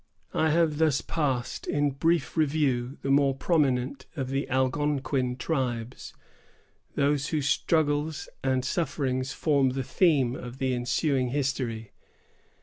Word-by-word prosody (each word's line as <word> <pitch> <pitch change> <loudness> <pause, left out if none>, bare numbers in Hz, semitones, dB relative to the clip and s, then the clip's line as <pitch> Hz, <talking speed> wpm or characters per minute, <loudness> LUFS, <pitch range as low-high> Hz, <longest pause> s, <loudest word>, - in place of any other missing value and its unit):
I 160 - +2
have 160 -1 +2
thus 155 -4 +3
passed 135 -6 -2
in 145 -1 +1
brief 165 +5 0
review 140 -5 +1
the 135 - 0
more 140 -1 +4
prominent 135 -3 0
of 135 -3 -3
the 135 +1 -2
Algonquin 130 -1 0
tribes; 125 -5 -3 0.8
those 145 -1 +1
whose 150 -4 -1
struggles 150 0 +1 0.2
and 130 -1 +1
sufferings 135 -5 -1
form 140 -2 +2
the 130 +1 -2
theme 135 -6 +2
of 125 0 -8
the 130 -1 0
ensuing 130 +2 0
History. 125 -5 -2
135 Hz, 125 wpm, -27 LUFS, 130-150 Hz, 0.8 s, more